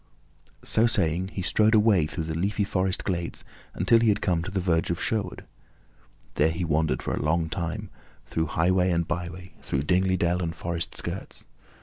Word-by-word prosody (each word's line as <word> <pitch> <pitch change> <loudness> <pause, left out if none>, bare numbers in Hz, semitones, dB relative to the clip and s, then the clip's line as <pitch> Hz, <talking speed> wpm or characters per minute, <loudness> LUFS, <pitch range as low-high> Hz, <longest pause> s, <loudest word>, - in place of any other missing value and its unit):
So 115 +2 +3
saying, 90 -4 0
he 95 - -3
strode 110 +4 +3
away 105 -7 +4
through 80 +1 -4
the 80 0 -4
leafy 100 +6 0
forest 95 -2 -1
glades 85 -3 -3 0.3
until 115 +6 +4
he 115 -1 +3
had 105 -1 +2
come 90 -5 +1
to 90 - -5
the 95 0 -1
verge 85 -3 +1
of 85 - -1
Sherwood. 105 -6 -2 0.9
There 75 +2 +3
he 85 +2 -2
wandered 80 -1 0
for - - -2
a - - -2
long 80 +2 +1
time, 85 -2 -4 0.3
through 80 0 -1
highway 90 +2 +3
and 85 -2 +1
byway, 90 0 -5
through 70 0 -2
dingly 95 +3 +2
dell 85 +1 +1
and 85 -1 -3
forest 85 0 -4
skirts. - - -6
90 Hz, 185 wpm, -26 LUFS, 80-95 Hz, 0.9 s, away